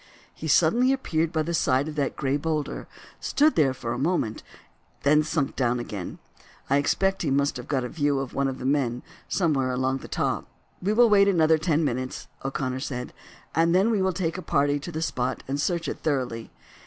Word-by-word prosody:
He 160 - -6
suddenly 180 - +4
appeared 165 -11 -1
by 155 -1 0
the 170 +2 -3
side 135 -3 +2
of 155 - -5
that 145 -2 -1
gray 135 0 0
boulder, 150 0 -2 0.3
stood 305 +2 +3
there 145 -4 +4
for 120 -2 -4
a - - -4
moment, 135 -8 0 0.6
and 150 +2 +5
sunk 150 -2 -1
down 125 -2 +1
again. 105 -6 -6 0.5
I 140 - +5
expect 195 +7 +1
he 155 - 0
must 140 +1 +1
have 125 - -8
got 135 -3 0
a - - -2
view 145 -2 0
of 135 -2 -4
one 140 0 +1
of 130 -1 -3
the - - -7
men 130 -3 0 0.2
somewhere 145 -8 +1
along 130 +1 0
the - - -10
top." - - -1 0.3
"We 195 +3 0
will 235 +2 +6
wait 200 -2 +5
another 160 -4 +4
ten 160 -1 +1
minutes," 130 -1 -3 0.2
O'Connor 135 -1 -2
said, 125 -2 -5 0.4
"and 165 +1 +3
then 195 +5 +4
we 210 -3 +1
will 190 0 +2
take 175 -1 -2
a - - -5
party 145 -3 +1
to 175 - -7
the 160 0 -3
spot 125 -4 -2
and 140 +2 -1
search 170 -1 -1
it - - -4
thoroughly. 130 -6 -2
145 Hz, 205 wpm, -26 LUFS, 130-165 Hz, 0.6 s, will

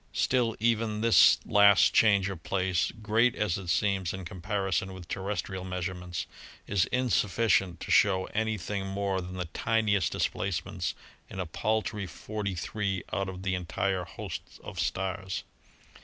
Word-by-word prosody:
Still, 120 -3 +1
even 110 -1 +1
this 115 0 +7
last 100 -1 +6
change 100 -3 +4
of 95 -4 -5
place, 95 -1 0
great 115 +3 +3
as 100 -4 0
it 95 - -9
seems 95 +1 +1
in 95 -1 -7
comparison 95 +2 -2
with 90 -2 -10
terrestrial 95 0 -3
measurements, 90 -2 -4 0.4
is 100 -3 +2
insufficient 110 -7 +1
to - - -5
show 95 -2 +4
any 110 0 0
thing 95 +1 -4
more 95 -1 -1
than 90 +1 -7
the 90 -1 -3
tiniest 100 +2 +1
displacements - - -2 0.3
in 95 - -7
a 90 - -1
paltry 105 +3 -1
forty 105 0 -4
three 95 +2 -2
out 100 -1 -1
of 95 0 -7
the 95 -1 0
entire 90 +1 -1
host - - -6 0.2
of - - -7
stars. 95 0 -2
95 Hz, 145 wpm, -29 LUFS, 90-105 Hz, 0.4 s, this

